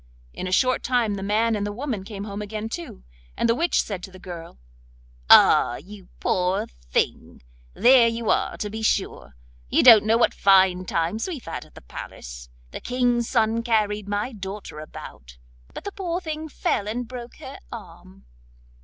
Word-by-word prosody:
In 185 - -5
a - - -4
short 255 +6 +2
time 240 -4 +1
the 200 - -4
man 215 +3 +1
and 205 - -2
the 205 - -2
woman 230 -3 -4
came 200 -1 -7
home 205 0 -6
again 215 +1 -5
too, 170 - -7 0.3
and - - +1
the 230 - +4
witch 335 +9 +1
said 195 -4 -5
to 190 - -8
the 185 - -12
girl: 175 - -9 0.7
'Ah! 120 - +7
you 190 +5 -12
poor 180 +1 0 0.2
thing, - - -2 0.3
there 245 -1 +6
you 230 -1 -1
are - - 0
to 210 - -4
be 220 +1 -5
sure! 65 - -1 0.3
You - - +3
don't 230 -4 +9
know 225 +1 +4
what 235 - +3
fine 190 -2 +4
times 170 - -1
we 365 - -3
have 265 - -11
had 165 - -6
at - - -22
the - - -12
palace! - - -9 0.2
The - - -7
King's 245 -2 0
son 225 -2 +2
carried 210 -3 0
my 205 +5 -1
daughter 195 -5 -7
about, 60 - -11 0.3
but - - -9
the 405 - -5
poor 355 -3 -3
thing 315 -2 -5
fell 205 -7 -1
and 235 +3 -3
broke 245 -1 -9
her - - -10
arm. 65 +1 -12
210 Hz, 185 wpm, -24 LUFS, 185-235 Hz, 0.7 s, don't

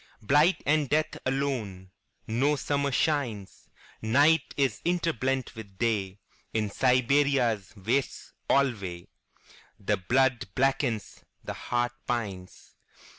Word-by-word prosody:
Blight 145 - +3
and 150 -2 +2
death 155 +1 +1
alone.No 125 0 -2
summer 140 0 -1
shines. 130 -9 -1 0.3
Night 145 +8 +3
is 130 -7 0
interblent 135 -7 -1
with 100 -4 -11
Day.In 105 0 -3
Siberia's 125 -5 +2
wastes 125 +8 -2 0.2
alwayThe 100 -11 0 1.0
blood 130 -2 +2
blackens, 130 -4 0 0.2
the - - -5
heart 120 0 -1 0.2
pines. 100 -7 -5
125 Hz, 85 wpm, -28 LUFS, 110-140 Hz, 1.0 s, Blight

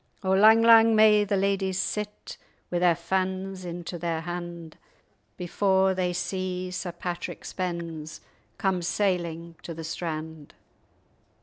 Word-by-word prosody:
O 190 - 0
lang, 220 +4 +6
lang 225 -1 +7
may 215 -1 +6
the 200 0 0
ladyes 195 -1 0
sit, 210 +2 -4 0.4
Wi' 175 - 0
their 175 -1 +4
fans 190 +2 -2
into 175 0 -6
their 165 -1 -2
hand, 175 -1 -7 0.6
Before 190 +1 +2
they 185 -1 0
see 185 0 -3
Sir 180 -1 -4
Patrick 175 0 -6
Spens 170 -4 -5 0.4
Come 190 -3 0
sailing 170 -3 -1
to 170 - -7
the 165 - -7
strand! 160 -2 -6
180 Hz, 125 wpm, -26 LUFS, 170-190 Hz, 0.6 s, lang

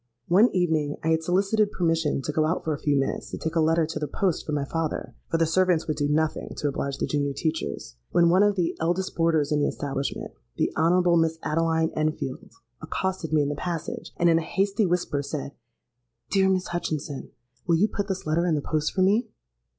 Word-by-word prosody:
One 205 +8 +6
evening 160 -5 0
I 160 - +1
had 160 0 +2
solicited 200 +5 +2
permission 165 -5 0
to 150 - -2
go 155 +1 +1
out 165 - -1
for 160 - -1
a 145 - -5
few 145 -1 +1
minutes 135 - -2
to - - -5
take 160 +1 -4
a - - +3
letter 160 +1 +3
to 160 - -4
the 150 - -2
post 180 +3 -1
for - - -2
my 145 -2 0
father 165 +2 -3 0.2
(for 165 - +1
the 165 - +3
servants 175 0 +2
would 155 -2 -1
do 145 -1 +1
nothing 155 +1 0
to 150 - -1
oblige 140 -1 -2
the - - -1
junior 145 -1 -1
teachers), 145 - -3
when 170 -1 +4
one 185 +2 +5
of 205 -1 +4
the 175 -3 0
eldest 175 +3 -1
boarders 160 -3 +2
in 150 - +2
the 145 - +2
establishment 140 -1 -3 0.3
(the - - 0
Honourable 175 +2 +3
Miss 165 0 +2
Adeline 160 +1 +1
Enfield) 155 -4 -2 0.3
accosted 190 -4 -3
me 155 -2 +3
in 140 - -1
the - - -1
passage, 165 +2 -4
and, 175 - +3
in 165 -1 +5
a - - -3
hasty 195 +4 0
whisper, 175 -5 0
said, 140 0 -5 0.8
'Dear 190 -1 +4
Miss 185 -1 0
Hutchinson, 155 -5 -4 0.4
will 170 - +4
you 190 +6 +3
put 205 -2 -3
this 190 -2 -3
letter 165 +3 +1
in 165 - +2
the 145 - -1
post 155 +1 -1
for 190 - +2
me?' 210 +6 +2
165 Hz, 220 wpm, -26 LUFS, 150-180 Hz, 0.8 s, One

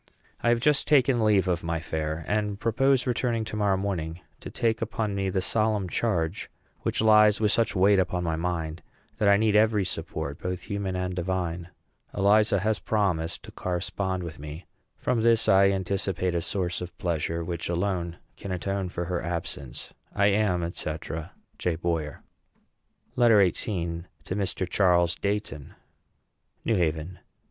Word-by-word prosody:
I 120 - +2
have 120 0 +3
just 140 +2 +3
taken 130 -5 +4
leave 100 -3 +3
of 90 -1 0
my 85 0 -1
fair, 80 0 -3
and 105 -1 -1
propose 130 +4 +2
returning 120 -2 0
to 110 - -6
morrow 100 -2 +2
morning 85 -4 -3 0.2
to - - -8
take 110 -1 0
upon 110 -2 -2
me 100 -1 -1
the 95 0 -1
solemn 110 -3 +1
charge 90 -3 -1 0.3
which - - -1
lies 105 -1 +6
with 105 -2 +2
such 115 -1 +1
weight 95 +1 +5
upon 90 -1 0
my 80 -2 0
mind 80 -1 -3 0.4
that 105 -3 +4
I 100 - +6
need 110 0 +2
every 105 -2 +4
support, 70 -4 -4
both 90 -1 -3
human 100 -2 -3
and 90 0 -2
divine. 90 -1 -2 0.5
Eliza 100 0 +4
has 110 +1 0
promised 90 -7 -1
to - - -11
correspond 90 +1 -2
with 80 -3 -7
me. 75 +4 -8 0.3
From 125 -3 0
this 115 0 +3
I 95 0 +6
anticipate 95 -1 -1
a 85 - 0
source 90 -1 -2
of 90 0 -7
pleasure 85 -1 -1
which 85 0 -4
alone 85 -1 -1 0.2
can 100 - -6
atone 95 +1 -2
for 85 0 -4
her 90 0 -2
absence. 80 -6 -5 0.2
I 100 0 +4
am, 95 -5 +1
&c., 80 - -3 0.6
J. 90 -2 0
BOYER. 80 -3 -3 0.9
LETTER 115 -6 +6
XVIII. 85 -6 -3 0.2
TO 95 - -4
MR. 95 -2 -1
CHARLES 85 -2 +3
DEIGHTON. 100 -8 -3 0.9
NEW 115 - +2
HAVEN. 85 0 -1
95 Hz, 160 wpm, -27 LUFS, 85-105 Hz, 0.9 s, lies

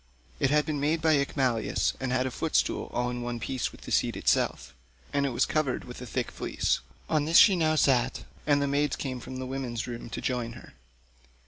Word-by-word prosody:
It 135 - +3
had 150 +1 +3
been 150 -2 -2
made 150 +3 +1
by 155 -2 +3
Icmalius 130 -6 0
and 130 -1 -2
had 130 0 +1
a 130 - -2
footstool - - 0
all 125 0 -1
in 120 0 -4
one 120 0 -3
piece 130 +3 -2
with - - -15
the - - -9
seat - - +1
itself; - - 0 0.4
and 140 0 +2
it - - -2
was 120 - +2
covered 150 -5 0
with 125 0 -9
a 125 - -7
thick - - -2
fleece: - - -1 0.3
on 150 -2 +1
this 165 +2 +4
she 195 - +8
now 160 -2 +2
sat, 135 -4 +2 0.2
and 145 -1 +4
the - - 0
maids 145 +1 +1
came 130 -3 -4
from 130 +2 -8
the 130 - -4
women's 130 -3 -3
room 120 -1 -7
to - - -5
join 120 -2 -2
her. 120 - -13
130 Hz, 220 wpm, -28 LUFS, 125-145 Hz, 0.4 s, she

